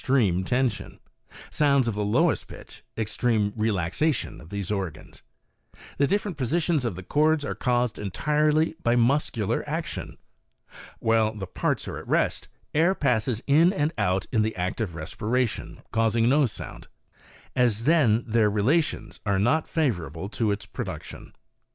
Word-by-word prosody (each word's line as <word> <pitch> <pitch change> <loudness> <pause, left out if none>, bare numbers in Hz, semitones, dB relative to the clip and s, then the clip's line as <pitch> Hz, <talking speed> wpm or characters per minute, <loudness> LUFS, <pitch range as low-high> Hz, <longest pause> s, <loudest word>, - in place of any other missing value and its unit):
55 135 0 +2
treme 95 -6 +2
tension, 125 -3 -1 0.5
sounds 140 -4 +3
of 115 - 0
the 105 +1 -2
lowest 105 +1 +2
pitch - - -12
extreme 110 -1 0
relaxation 110 - -1
of 80 - -14
those 100 -1 -4
organs. 85 -7 -5 0.8
The 140 - +4
different 205 -2 -1
positions 155 +3 0
of 110 -7 -2
the 95 - -8
cords 150 - +2
are - - -2
caused 120 -3 0
entirely 150 - +1
by 120 +1 +2
muscular 120 -4 +1
action. - - -4 0.8
While 110 -1 +2
the 100 -2 -5
parts 90 - -2
are - - -5
at - - -12
rest, - - 0 0.3
air 170 +5 +3
passes 120 - 0
in 160 +5 +5
and 160 -4 0
out 90 +1 0
in 110 - +2
the 110 +1 -1
act 90 +5 -2
of 90 -7 -3
respiration, 110 +9 -2
causing 115 +1 +2
no 140 +2 +4
sound, 105 - -8 0.7
as 120 -3 +2
then 130 -9 +4
their 110 -2 +3
relations 130 +11 0
are 100 -3 +1
not 120 +11 +2
favorable 95 - -2
to 110 0 -1
its 100 0 -2
production. - - -7
115 Hz, 150 wpm, -26 LUFS, 105-145 Hz, 0.8 s, in